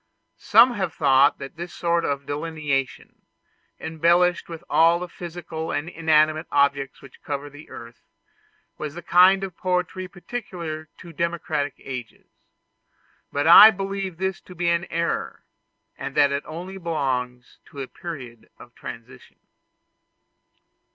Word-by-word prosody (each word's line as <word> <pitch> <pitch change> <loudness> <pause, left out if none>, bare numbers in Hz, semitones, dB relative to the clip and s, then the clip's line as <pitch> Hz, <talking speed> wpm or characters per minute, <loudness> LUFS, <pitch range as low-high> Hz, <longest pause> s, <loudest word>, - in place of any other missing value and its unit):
Some 250 0 +6
have 190 -7 -3
thought 140 -1 +4
that 135 +3 -9
this 175 +1 -6
sort 170 -1 0
of 140 0 -2
delineation, 145 -3 -3 0.6
embellished 170 +3 +2
with 165 0 -8
all 165 +1 +4
the 180 +1 -5
physical 170 -2 -6
and 150 - -2
inanimate 155 -1 +2
objects 140 -1 +1
which 135 - -15
cover 145 0 -5
the 145 +2 -14
earth, 115 0 -11 0.8
was 155 0 -5
the 175 - -8
kind 190 +2 +5
of 190 -3 -5
poetry 185 +1 -2
peculiar 175 -6 -7
to 170 -2 -12
democratic 160 -3 -2
ages; 125 -3 -8 1.1
but 145 0 -1
I 190 +6 +11
believe 195 -3 -4
this 190 +1 -2
to 180 - -14
be 175 0 0
an 170 +1 +1
error, 170 -1 -3 0.5
and - - -6
that 140 -1 +4
it 140 0 -1
only 180 +5 -7
belongs 130 -7 -3
to 140 - -12
a 135 - -4
period 130 -10 -9
of 120 - -14
transition. 125 +2 -11
160 Hz, 135 wpm, -24 LUFS, 140-175 Hz, 1.1 s, I